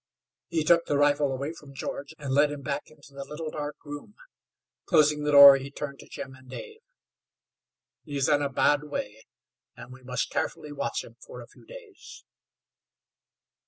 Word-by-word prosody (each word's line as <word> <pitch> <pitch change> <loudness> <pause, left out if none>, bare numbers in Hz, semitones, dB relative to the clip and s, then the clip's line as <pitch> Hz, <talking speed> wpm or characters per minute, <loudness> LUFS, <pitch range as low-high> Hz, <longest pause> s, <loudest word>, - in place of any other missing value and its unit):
He 165 -2 -1
took 170 +2 +4
the 145 - +1
rifle 145 -1 +3
away 140 +4 -4
from 145 -4 -14
George, 140 +3 -6
and 140 -3 -4
led 145 +2 +4
him 145 -1 -7
back 140 +1 -4
into 145 -2 -19
the 140 0 -7
little, 155 +2 -6
dark 150 -1 -5
room. 145 +8 -9 0.7
Closing 150 -1 +4
the 150 0 0
door 140 -1 +10
he 135 +1 -7
turned 140 -1 -7
to - - -13
Jim 135 - -8
and 130 -1 -17
Dave. 440 - -9 1.2
"He 145 -3 -6
is 135 - +1
in 145 -1 +3
a 140 - 0
bad 145 +2 +2
way, 110 -7 -6 0.5
and 125 +1 -11
we 130 - -14
must 125 -1 -3
carefully 150 - -3
watch 145 - -3
him - - -15
for - - -11
a - - -9
few - - -20
days." - - -13
145 Hz, 180 wpm, -27 LUFS, 140-150 Hz, 1.2 s, door